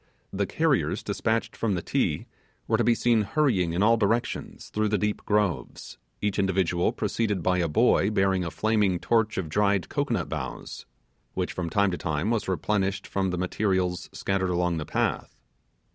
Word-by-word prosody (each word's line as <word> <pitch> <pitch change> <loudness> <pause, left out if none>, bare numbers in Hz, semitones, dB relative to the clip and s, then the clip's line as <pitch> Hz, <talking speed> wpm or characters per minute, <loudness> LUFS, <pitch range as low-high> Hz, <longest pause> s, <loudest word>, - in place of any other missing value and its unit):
The - - 0
carriers - - +1
dispatched 115 0 -1
from 105 -4 0
the 85 - -3
Ti - - 0 0.4
were 110 0 +2
to - - +3
be 120 0 +4
seen 115 -1 +3
hurrying 100 - +1
in 90 +4 +1
all 115 +2 +5
directions 115 +2 -1
through 110 0 0
the 105 0 +1
deep 105 +1 -1
groves; 100 - -1 0.2
each 105 0 0
individual 95 -3 +1
preceded 105 -6 -1
by 90 +1 +2
a 85 - +1
boy 90 +5 +3
bearing 95 -3 +1
a 85 - -3
flaming 105 -2 +1
torch 110 +3 +1
of 95 - -2
dried 100 +2 +1
cocoanut - - -1
boughs, - - -6 0.5
which - - -2
from 85 -2 -3
time 100 +2 +2
to 90 - -4
time 80 +6 -1
was 115 -3 -1
replenished 95 +1 -1
from 95 -1 -1
the 90 - -2
materials 90 -1 -1
scattered 95 -1 -1
along 90 -1 0
the 75 - -4
path. - - -1
95 Hz, 175 wpm, -26 LUFS, 90-110 Hz, 0.5 s, all